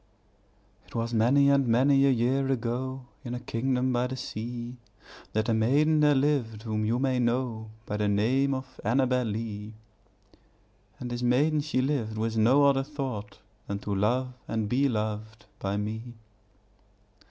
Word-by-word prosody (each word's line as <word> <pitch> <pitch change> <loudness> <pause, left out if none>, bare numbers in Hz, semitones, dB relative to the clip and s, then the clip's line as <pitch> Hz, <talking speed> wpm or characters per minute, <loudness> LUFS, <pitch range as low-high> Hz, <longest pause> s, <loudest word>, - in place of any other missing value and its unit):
It - - -16
was 115 +1 -2
many 125 +6 +4
and 140 -2 +3
many 135 +4 +4
a - - +5
year 130 +2 +1
ago, 130 +1 -2 0.2
In 120 -2 -4
a - - -4
kingdom 125 +1 -1
by 125 +1 +1
the 130 +1 -5
sea, 120 +1 -6 0.6
That 110 +1 0
a 115 - +2
maiden 145 +8 +3
there 150 -1 +5
lived 130 -6 0
whom 110 -1 -1
you 115 +3 +1
may 130 -1 +1
know 120 -2 -1 0.2
By 105 - -3
the 105 0 0
name 130 +7 +2
of 130 0 -8
Annabel 125 +2 +2
Lee; 105 0 -5 1.2
And 125 -1 -5
this 120 0 -3
maiden 145 +5 +2
she 145 -4 0
lived 120 -6 -1
with 115 +1 -1
no 120 +6 +4
other 140 -1 +4
thought 135 -8 -5 0.3
Than 100 - -2
to 105 - -3
love 125 +6 0
and 110 -2 -1
be 135 +5 +2
loved 110 -1 -4
by 100 +1 -2
me. 110 +3 -5
120 Hz, 160 wpm, -28 LUFS, 110-135 Hz, 1.2 s, a